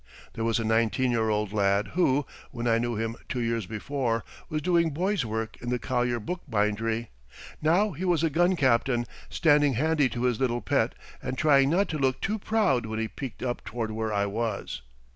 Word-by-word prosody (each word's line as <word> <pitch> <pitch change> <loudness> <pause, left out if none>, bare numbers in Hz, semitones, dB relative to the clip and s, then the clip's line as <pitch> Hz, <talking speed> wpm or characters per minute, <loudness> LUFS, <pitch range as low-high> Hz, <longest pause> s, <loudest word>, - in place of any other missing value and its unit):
There 115 - -3
was 115 -1 +2
a - - -1
nineteen 115 +3 +2
year 110 -2 +1
old 105 -1 0
lad 100 -1 +2
who, 145 -6 +2 0.2
when 120 - -5
I 115 -1 +3
knew 120 0 -1
him 115 +1 -3
two 125 - -2
years 115 -4 -1
before, 115 +1 -2 0.3
was 155 -1 -2
doing 170 -2 +3
boy's 180 - 0
work 110 0 -4
in 120 - -4
the 125 - +1
Collier 120 +1 0
bookbindery. 115 - -1 0.5
Now 180 +7 +3
he 170 +3 -6
was 175 -4 +2
a 165 - +2
gun 175 +5 +3
captain 120 -4 +2 0.2
standing 145 -3 +4
handy 150 +2 +2
to 120 0 -4
his 125 -3 +1
little 120 -2 0
pet - - +1 0.3
and 130 0 -4
trying 140 -2 +4
not 190 +6 +2
to 155 - -2
look 130 -2 +1
too 215 +2 -1
proud 195 - +1
when 110 0 -4
he 110 0 -1
peeked 130 +1 -7
up 120 -1 -2
toward 115 -2 -4
where 110 0 -2
I 100 -1 +1
was. 100 - -3
120 Hz, 200 wpm, -27 LUFS, 110-150 Hz, 0.5 s, standing